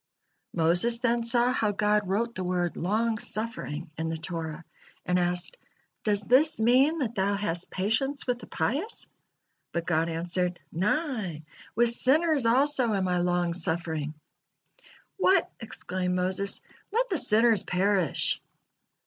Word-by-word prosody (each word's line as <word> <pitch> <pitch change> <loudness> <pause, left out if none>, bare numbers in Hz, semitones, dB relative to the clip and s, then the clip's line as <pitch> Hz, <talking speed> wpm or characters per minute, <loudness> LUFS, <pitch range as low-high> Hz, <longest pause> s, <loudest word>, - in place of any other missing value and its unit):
Moses 175 +8 +3
then 235 -1 0
saw 240 +1 +3
how 215 -4 0
God 210 0 +1
wrote 230 +4 -1
the 185 - -5
word 180 -1 -1
"long 220 +5 0
suffering" 180 -8 -4
in 160 0 -2
the 160 - -3
Torah, 165 -1 -5 0.4
and 180 0 +1
asked: 180 - 0 0.5
"Does 205 -1 +1
this 275 +8 +4
mean 260 +8 +4
that 250 -7 -2
Thou 200 -1 0
hast 175 -4 -3
patience 225 +9 0
with 245 -1 -1
the - - -11
pious?" 335 - -2 0.7
But 170 -1 -2
God 165 -1 +1
answered: 175 +2 -1
"Nay, 205 - -2 0.3
with 240 0 +4
sinners 280 +2 +3
also 260 0 +2
am 190 -1 0
I 180 0 0
long 175 -1 0
suffering." 160 -3 -1 1.0
"What!" 375 -1 +3
exclaimed 185 -5 -4
Moses, 185 +2 -1 0.3
"Let 475 +2 0
the 360 - +3
sinners 225 -3 +4
perish!" 185 -3 +1
205 Hz, 135 wpm, -27 LUFS, 175-240 Hz, 1.0 s, this